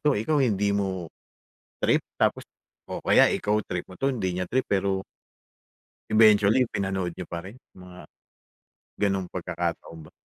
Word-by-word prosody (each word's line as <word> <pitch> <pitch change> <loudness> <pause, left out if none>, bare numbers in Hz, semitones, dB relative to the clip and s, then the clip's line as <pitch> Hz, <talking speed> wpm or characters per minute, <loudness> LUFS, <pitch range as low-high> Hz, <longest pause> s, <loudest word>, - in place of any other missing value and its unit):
'to, 150 -2 +2
ikaw 145 +8 +1
hindi 105 -5 +2
mo 95 -4 -2 0.7
trip - - +2 0.2
tapos - - +1 0.5
o - - -6
kaya - - +6
ikaw 105 +1 0
trip 90 -1 -4
mo 95 - -12
'to, 135 - +2
hindi 105 -9 -1
niya 90 0 -3
trip 130 +1 +1
pero 95 -1 0 1.1
eventually 110 +2 +5
pinanood 95 -3 -2
niyo 90 +1 -8
pa 85 0 -6
rin? 100 +6 -10 0.2
Mga 90 -1 -12 1.0
ganong 95 -2 +1
pagkakataon 85 -2 -5
ba. - - -16
95 Hz, 145 wpm, -26 LUFS, 90-105 Hz, 1.1 s, kaya